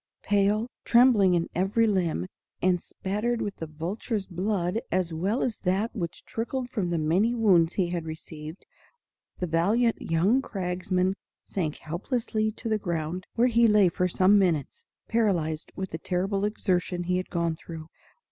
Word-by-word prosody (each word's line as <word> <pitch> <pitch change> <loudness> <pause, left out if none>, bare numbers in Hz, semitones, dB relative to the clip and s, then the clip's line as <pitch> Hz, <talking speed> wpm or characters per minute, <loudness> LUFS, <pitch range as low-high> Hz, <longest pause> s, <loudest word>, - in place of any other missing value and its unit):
Pale, 205 +2 +2 0.2
trembling 235 -7 +5
in 170 -1 0
every 195 +6 +2
limb, 175 - 0 0.3
and 180 -1 +2
spattered 215 +5 -2
with 205 -3 -3
the 160 - -5
vulture's 190 - -3
blood 185 +2 -1
as 180 -2 0
well 195 +9 0
as 235 - -2
that 195 +5 0
which 170 -6 -5
trickled 245 +2 -3
from 200 -8 -1
the 170 - 0
many 180 +10 +2
wounds 180 -7 +4
he 180 -3 +1
had 170 -2 -3
received, 155 +1 -8 0.7
the 180 - -2
valiant 205 +9 +2
young 190 +11 +2
cragsman 185 -3 -1 0.3
sank 160 -6 -2
helplessly 215 - -2
to 230 - -7
the 215 -1 +1
ground, 175 -1 -3
where 235 - +4
he 235 -1 +4
lay 210 -4 +5
for 180 +2 0
some 190 +3 +4
minutes, 165 -8 -1 0.2
paralyzed 175 -9 0
with 190 -1 -4
the 160 - -4
terrible 195 +4 -1
exertion 180 -4 -1
he 180 +1 0
had 185 - -4
gone 170 -2 0
through. 160 -1 -9
185 Hz, 155 wpm, -27 LUFS, 170-215 Hz, 0.7 s, trembling